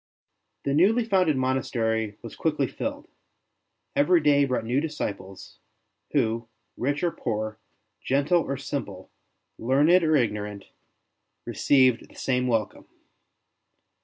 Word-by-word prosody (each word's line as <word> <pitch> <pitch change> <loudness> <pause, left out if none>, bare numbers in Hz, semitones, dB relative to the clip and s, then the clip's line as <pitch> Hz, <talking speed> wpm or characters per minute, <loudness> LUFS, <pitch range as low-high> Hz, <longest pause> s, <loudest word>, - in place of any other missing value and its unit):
The 140 - 0
newly 215 +10 +4
founded 185 -9 +2
monastery 115 -5 -1
was - - -8
quickly - - 0
filled; - - -5 0.9
every 170 +5 +4
day 145 -2 +4
brought 130 -4 -2
new 125 +5 +1
disciples, 100 - -6 0.5
who, 115 -4 0 0.3
rich 145 +5 -2
or 175 - +2
poor, 110 -4 -4 0.4
gentle 145 +6 +2
or 140 -3 -3
simple, 115 -9 -6 0.5
learned 150 +9 +4
or 155 -1 +3
ignorant, 105 -5 -1 0.8
received 130 -4 +2
the - - -19
same 125 -1 0
welcome. 115 -4 -1
130 Hz, 110 wpm, -26 LUFS, 110-150 Hz, 0.9 s, newly